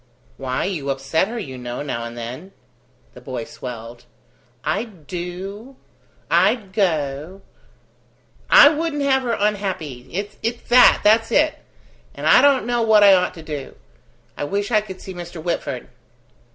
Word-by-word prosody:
Why, 130 -1 -2
you 155 -8 -3
upset 135 +6 0
her, 235 +2 -6
you 130 - -6
know, 125 +2 -5
now 120 -5 -4
and 115 0 -8
then." 130 +12 -7 0.6
The - - -13
boy 125 -3 -5
swelled. 120 0 -9 0.6
"I'd 190 +1 -4
do... 190 - -7 0.5
I'd 205 -6 +2
go... 160 -1 -1 1.1
I 285 - +9
wouldn't 305 -1 -2
have 265 -1 +3
her 240 -3 -1
unhappy... 190 -11 -2
It's 210 +5 -5
that! 250 +1 +7
that's 225 +2 +4
it! 305 +4 +2 0.6
And - - -6
I - - +7
don't 280 -4 +4
know 240 0 0
what 220 -2 +5
I 200 -1 +8
ought 180 -1 +2
to 165 - -10
do. 150 -3 -7 0.6
I - - -4
wish 200 +9 -2
I 215 -2 +4
could 190 -3 -10
see 190 - -8
Mr. 175 -1 -8
Whitford." 170 +2 -3
190 Hz, 150 wpm, -21 LUFS, 140-220 Hz, 1.1 s, I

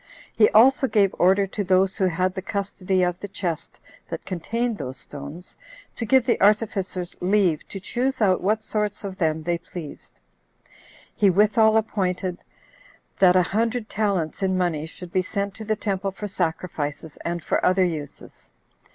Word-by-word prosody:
He 215 - +5
also 265 +5 +5
gave 205 -4 +3
order 195 +2 +4
to 205 +2 -4
those 190 0 +2
who 190 - +2
had 185 +2 0
the 190 - -4
custody 190 -1 -1
of 180 0 -1
the 205 - -6
chest 175 -4 -4 0.3
that - - -6
contained 230 +6 -2
those 130 +1 -5
stones, 145 +7 -9 0.4
to 230 - -4
give 260 0 +4
the 235 - +1
artificers 200 -4 +1
leave 180 -4 +2
to 195 - -7
choose 255 +7 -2
out 195 -4 +3
what 215 +3 +1
sorts 210 -1 -2
of 195 -1 -6
them 160 -2 0
they 170 +1 -1
pleased. 165 - -10 1.0
He 200 - +4
withal 215 +3 +4
appointed, 185 -4 -1 0.8
that 185 -2 +6
a 185 - +5
hundred 225 +4 -1
talents 195 -7 -1
in 190 -1 +1
money 165 -4 -1
should 175 +1 -10
be 185 - +3
sent 200 +1 -3
to 220 +2 -9
the 215 0 0
temple 195 -2 -2
for 200 +2 -6
sacrifices, 160 -5 -3
and 170 -1 -3
for - - 0
other 185 0 +4
uses. 155 -5 -7
190 Hz, 165 wpm, -24 LUFS, 175-210 Hz, 1.0 s, that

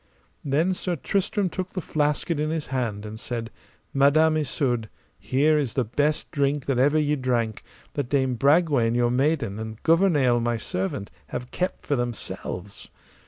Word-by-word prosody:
Then 155 +7 +2
Sir 180 -1 -2
Tristram 195 - 0
took 185 +1 -5
the 185 - -2
flasket 150 0 0
in 155 +1 0
his 160 -1 -2
hand, 110 -5 -2
and 110 +1 -7
said, 115 -1 -4 0.4
Madam 155 +3 +4
Isoud, 125 -7 -1 0.3
here 150 +4 +2
is 135 -6 -2
the 130 - +2
best 145 +7 0
drink 140 -1 0
that 135 -3 0
ever 145 +4 +4
ye 150 -1 +2
drank, 120 -5 -1 0.3
that 140 -4 -3
Dame 130 -2 +2
Bragwaine, 140 -3 +3
your 120 0 +2
maiden, 135 -5 +1
and 110 0 -6
Gouvernail, 160 -8 +4
my 120 0 0
servant, 100 -1 -3 0.2
have 125 - -6
kept 180 +1 -3
for 145 - +1
themselves. 110 -5 -4
140 Hz, 160 wpm, -25 LUFS, 120-155 Hz, 0.4 s, Madam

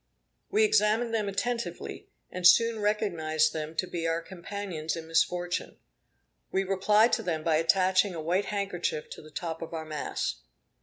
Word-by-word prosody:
We 425 +2 +3
examined 235 - +3
them 215 -3 0
attentively, 235 +4 -3 0.2
and 180 -1 +4
soon 230 +2 +5
recognized 165 -7 +1
them 155 0 -5
to 185 - 0
be 170 -2 -3
our 165 0 +1
companions 180 -3 -5
in 165 -1 -6
misfortune. 175 +2 0 0.7
We 190 - +1
replied 210 +4 +3
to - - +2
them 160 -3 -2
by 160 -1 +3
attaching 185 +3 +3
a - - -4
white 175 +5 0
handkerchief 195 -7 -3
to - - -8
the 155 - -14
top 165 +1 -5
of 165 0 -6
our 160 -1 -4
mast. 150 - -3
180 Hz, 160 wpm, -28 LUFS, 160-205 Hz, 0.7 s, soon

